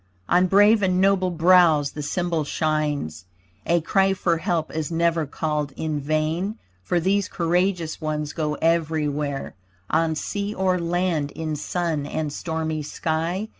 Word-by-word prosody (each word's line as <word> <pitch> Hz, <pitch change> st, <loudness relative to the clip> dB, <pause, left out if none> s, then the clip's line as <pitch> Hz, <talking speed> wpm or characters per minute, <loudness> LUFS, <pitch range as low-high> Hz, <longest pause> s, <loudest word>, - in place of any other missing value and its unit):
On 180 Hz, +1 st, +4 dB
brave 205 Hz, +3 st, +5 dB
and 185 Hz, -1 st, +2 dB
noble 190 Hz, -1 st, +3 dB
brows 170 Hz, -4 st, +4 dB
the 150 Hz, -, -6 dB
symbol 170 Hz, +1 st, -1 dB
shines. 150 Hz, -, -2 dB, 0.4 s
A 170 Hz, 0 st, +3 dB
cry 195 Hz, +4 st, +2 dB
for 175 Hz, -3 st, +1 dB
help 165 Hz, -3 st, -1 dB
is 160 Hz, 0 st, -3 dB
never 165 Hz, -2 st, +1 dB
called 150 Hz, -1 st, -2 dB
in 155 Hz, -2 st, -2 dB
vain, 155 Hz, +8 st, -1 dB, 0.2 s
For 175 Hz, -, 0 dB
these 195 Hz, +3 st, +1 dB
courageous 175 Hz, -1 st, 0 dB
ones 150 Hz, -1 st, -3 dB
go 150 Hz, -2 st, -1 dB
everywhere, 150 Hz, -4 st, -1 dB, 0.4 s
On 160 Hz, 0 st, +2 dB
sea 205 Hz, +6 st, -3 dB
or 185 Hz, -1 st, +1 dB
land, 170 Hz, -3 st, 0 dB
in 155 Hz, -1 st, -3 dB
sun 155 Hz, -1 st, -2 dB
and 150 Hz, -1 st, -3 dB
stormy 160 Hz, -2 st, -3 dB
sky. 165 Hz, +7 st, -2 dB
165 Hz, 140 wpm, -23 LUFS, 155-180 Hz, 0.4 s, brave